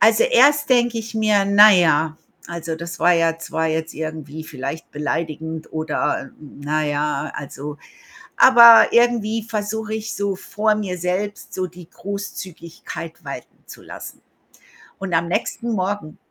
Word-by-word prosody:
Also, 470 - +5
erst 295 - +4
denke 240 -2 +3
ich 225 0 -7
mir 215 -2 +2
„Na 205 +2 +7
ja, 160 -3 +2 0.3
also, 165 -1 -5
das 170 +1 -7
war 180 - +5
ja 165 -1 +2
zwar 160 0 -2
jetzt 160 0 -2
irgendwie 155 -1 -6
vielleicht 140 +4 -7
beleidigend 160 +1 -4
oder 155 -3 -2
na 150 +1 -4
ja“, 150 0 -2
also 145 +1 -7 0.6
aber 235 -3 +8
irgendwie 230 -2 +2
versuche 215 0 -4
ich 220 0 -4
so 200 -1 -2
vor 215 +3 0
mir 195 -4 -4
selbst 185 +4 -4
so 185 -1 -2
die 175 -1 -14
Großzügigkeit 185 -5 -8
walten - - -8
zu - - -12
lassen. - - -10 0.8
Und 190 -2 -5
am 165 +1 +1
nächsten 230 +6 -2
Morgen 190 -5 -3
180 Hz, 140 wpm, -21 LUFS, 160-215 Hz, 0.8 s, aber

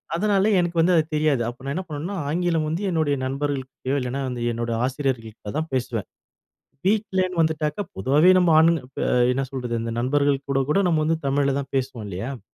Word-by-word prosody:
அதனால 200 +1 +2
எனக்கு 175 -1 -1
வந்து 175 +3 +4
அது 160 - +4
தெரியாது. 150 -4 +2
அப்போ 120 +2 -7
நான் 135 +1 -3
என்ன 185 - -2
பண்ணுவேன்னா, 160 +5 -5
ஆங்கிலம் 165 0 0
வந்து 165 +5 -2
என்னுடைய 155 -5 +1
நண்பர்கள்ட்டயோ 135 -1 -3
இல்லனா 125 +1 -3
வந்து 125 -2 -4
என்னோட 115 0 -3
ஆசிரியர்கள்ட்ட 125 -6 -3
தான் 160 +1 -1
பேசுவேன். 120 -5 -2 0.8
வீட்லன்னு 190 -3 +1
வந்துட்டாக்கா 155 +2 0
பொதுவாவே 140 - +4
நம்ம 180 -2 +3
ஆண், 165 +1 +6 0.2
ப - - -5 0.3
என்ன 135 +2 0
சொல்றது, 125 -3 -4
இந்த 115 - -3
நண்பர்கள் 140 +3 +2
கூட 135 0 +2
கூட 175 - +3
நம்ம 165 -3 +2
வந்து 165 +1 +1
தமிழ்ல 140 0 +1
தான் 140 - -6
பேசுவோம், 130 -4 -2
இல்லையா. 100 +5 -4
அ - - -18
145 Hz, 180 wpm, -23 LUFS, 130-165 Hz, 0.8 s, ஆண்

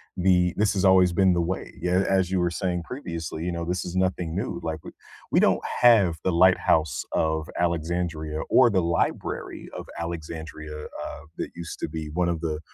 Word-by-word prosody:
the 90 -1 +3
this 105 0 +2
has 100 0 +1
always 95 -1 +6
been 95 +1 +4
the 85 - +1
way. 90 +2 -3
Yeah, 90 +2 +2
as 95 -2 +2
you 95 -1 +1
were 90 0 +1
saying 90 -1 -2
previously, 85 - -5
you 90 - -1
know, 85 -1 -3
this 90 +1 -2
is 90 - -6
nothing 90 -3 0
new, 105 +6 -2
like, 80 -1 -3
we - - -9 0.4
We - - +4
don't - - +3 0.2
have 100 -9 +6
the 95 - +1
Lighthouse 85 -5 +3
of 80 0 0
Alexandria 85 -2 -1
or 130 -2 +6
the 95 -4 +2
Library 85 0 -2
of - - -6
Alexandria, 80 -2 -6
uh, - - -7 0.2
that - - -3
used 85 -1 -7
to - - -3
be 80 -1 -5
one 85 +1 +1
of 85 - -1
the, 75 -2 -2
85 Hz, 195 wpm, -25 LUFS, 80-95 Hz, 0.4 s, always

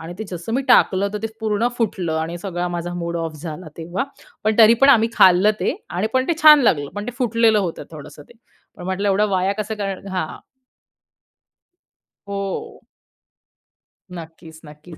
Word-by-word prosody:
आणि 165 +2 -8
ते 220 - -4
जसं 175 +5 -6
मी 270 - 0
टाकलं 200 -5 +4
तर - - -2
ते - - 0
पूर्ण 220 +2 0
फुटलं 190 -7 -1
आणि 165 +2 -4
सगळा 175 -1 -4
माझा 175 0 -4
मूड 170 -1 -4
ऑफ 165 -1 -4
झाला 160 0 -7
तेव्हा. 175 +7 -3 0.4
पण 215 0 +2
तरी 225 +1 +8
पण 275 - +7
आम्ही 230 -4 +5
खाल्लं 185 +3 +5
ते - - 0 0.2
आणि 185 +5 -1
पण 260 0 +2
ते - - +3
छान 300 -2 +9
लागलं. 145 -10 +1
पण 205 - -4
ते - - -3
फुटलेलं 230 -3 +2
होतं 180 -5 -3
थोडंसं 150 -1 -11
ते - - -18 0.4
पण 175 - -10
म्हटलं 190 +2 -2
एवढं 205 +2 +2
वाया 190 +1 +1
कसं 220 +1 -5
कर 195 -1 -5
हां. 185 -4 -4 1.9
हो. 200 -1 -5 1.3
नक्कीच, 160 -1 -11
नक्कीच 150 +3 -13
190 Hz, 170 wpm, -20 LUFS, 170-215 Hz, 1.9 s, छान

